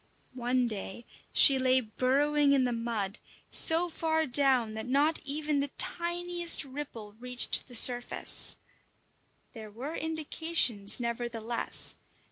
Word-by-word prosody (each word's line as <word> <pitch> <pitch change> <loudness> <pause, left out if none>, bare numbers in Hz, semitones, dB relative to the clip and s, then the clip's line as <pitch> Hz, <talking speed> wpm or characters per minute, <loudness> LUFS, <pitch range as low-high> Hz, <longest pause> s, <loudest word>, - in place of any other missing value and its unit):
One 250 0 -2
day 215 +1 -8 0.3
she 270 -2 +6
lay 260 0 +2
burrowing 280 +5 -1
in 270 -2 +1
the 250 - -2
mud, 230 -3 -5 0.3
so 330 +2 +5
far 320 -1 -2
down 255 -4 +2
that 220 +2 -8
not 290 +5 0
even 295 0 -3
the 280 - -2
tiniest 345 -1 0
ripple 260 -7 -10
reached 250 0 +3
the 245 - -10
surface. 245 +1 +2 1.0
There 220 -3 -11
were 250 +9 -9
indications 315 -9 -2
nevertheless. 235 -1 +1
255 Hz, 115 wpm, -28 LUFS, 235-300 Hz, 1.0 s, she